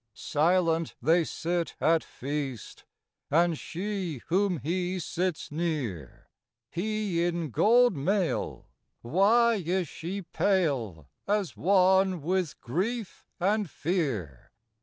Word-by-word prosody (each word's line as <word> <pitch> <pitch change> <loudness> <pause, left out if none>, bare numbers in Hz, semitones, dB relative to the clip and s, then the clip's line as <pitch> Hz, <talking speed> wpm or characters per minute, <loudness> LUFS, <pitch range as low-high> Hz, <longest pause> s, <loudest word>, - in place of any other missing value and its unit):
Silent 165 +1 +1
they 165 +6 +3
sit 170 +2 -2
at 165 0 +3
feast, 135 -3 -5 0.4
And 170 +2 +3
she, 180 - -4
whom 185 0 +2
he 180 +6 -2
sits 175 -1 -2
near, 145 - -3 0.4
He 200 -2 -1
in 170 -4 -1
gold 240 - +4
mail, 180 +5 -1 0.4
why 210 - +3
is 180 +1 0
she 185 +7 -5
pale, 135 - 0 0.2
As 205 -3 0
one 190 -1 +3
with 180 -1 -1
grief 200 - -3
and 205 +1 +1
fear? 135 - -2
175 Hz, 100 wpm, -28 LUFS, 155-190 Hz, 0.4 s, gold